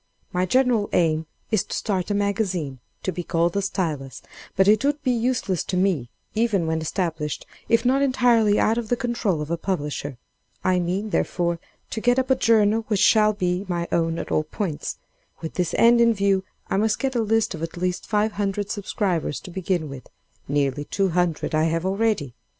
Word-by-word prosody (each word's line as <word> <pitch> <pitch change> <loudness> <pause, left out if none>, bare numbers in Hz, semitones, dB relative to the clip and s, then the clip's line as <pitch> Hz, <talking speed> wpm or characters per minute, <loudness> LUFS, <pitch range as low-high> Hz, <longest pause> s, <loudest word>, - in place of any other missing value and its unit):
"My 180 +1 +1
general 245 -2 +2
aim 160 -2 +2 0.2
is 215 -4 +2
to - - -5
start 190 -3 -1
a 205 - 0
Magazine, 190 - -1 0.2
to 185 - -1
be 180 - -4
called 170 0 0
'The 200 - 0
Stylus,' 160 -9 -3 0.3
but 190 +1 +4
it 215 +3 +5
would 290 +1 0
be 255 - +2
useless 235 -6 0
to 185 - -2
me, 180 -10 +1 0.2
even 215 -6 +1
when 160 0 -1
established, 160 -2 -2 0.2
if 230 +1 +3
not 265 +2 +3
entirely 240 -6 +3
out 225 +2 +2
of 225 -2 -6
the 245 - +3
control 235 -10 -1
of 150 - -7
a 170 - 0
publisher. 150 -7 -3 0.5
I 185 -1 +2
mean, 190 +5 -2
therefore, 170 -2 0 0.3
to 220 - -3
get 245 +2 +3
up 260 0 +1
a - - +6
journal 225 -2 +3
which 210 -3 +1
shall 215 +1 +5
be 180 -1 -1
my 175 -1 -2
own 165 -1 +1
at - - -5
all - - +3
points. 160 0 -4 0.4
With 160 - -6
this 180 -2 -1
end 235 +1 +6
in 230 -1 +4
view, 195 -1 +1 0.2
I - - 0
must 215 +1 +2
get 270 -1 -1
a 235 - +2
list 225 0 +1
of 160 - -7
at 165 +1 -5
least 180 0 -2
five 215 0 +1
hundred 205 0 -2
subscribers 195 -7 -1
to 180 - -10
begin 180 -3 -1
with; 140 -2 -9 0.4
nearly 145 0 0
two 195 +4 0
hundred 175 -3 0
I 155 +1 +3
have 165 +2 0
already. 195 - 0
190 Hz, 195 wpm, -24 LUFS, 165-220 Hz, 0.5 s, a